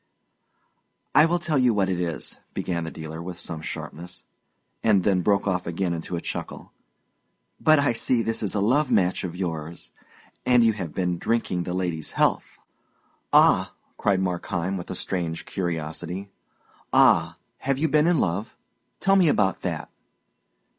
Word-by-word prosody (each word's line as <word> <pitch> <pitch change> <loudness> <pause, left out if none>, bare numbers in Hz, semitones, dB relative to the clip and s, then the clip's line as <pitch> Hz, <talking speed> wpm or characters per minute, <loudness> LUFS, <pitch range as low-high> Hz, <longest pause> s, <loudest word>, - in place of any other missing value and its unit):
"I 150 +2 +7
will 175 +1 +1
tell 165 -5 0
you 125 -3 +3
what 100 -2 +2
it 90 -2 -1
is," 85 -2 -3 0.2
began 85 -2 -2
the - - -4
dealer, 80 0 -7
with 90 0 -7
some 80 -3 -4
sharpness, 85 +2 -7 0.6
and 100 -4 +4
then 95 -2 +2
broke 100 +2 +2
off 90 -2 -1
again 85 +1 -1
into 85 +1 -4
a 85 - -3
chuckle. - - -6 0.9
"But 155 0 +5
I 140 -3 +3
see 115 +1 +2
this 115 0 -1
is 105 -3 0
a 100 - +1
love 130 +8 +2
match 90 -3 +2
of 90 -2 -4
yours, 80 -7 -5 0.5
and 125 -1 +5
you 115 -1 +4
have 90 -7 -5
been 90 -2 -1
drinking 95 -7 -1
the 90 - -3
lady's 85 -4 -3
health." - - 0 0.7
"Ah!" - - +5 0.2
cried 100 -3 +1
Markheim, 90 0 -2
with 90 -2 -6
a 95 - -4
strange 85 -3 -3
curiosity. 85 +2 -4 0.6
"Ah, - - +4 0.2
have 135 0 0
you 160 +3 +1
been 155 +1 +3
in 175 -1 +3
love? 95 +5 -1 0.5
Tell 195 0 +4
me 185 -3 +5
about 95 -8 +1
that." - - -4
95 Hz, 160 wpm, -25 LUFS, 85-115 Hz, 0.9 s, I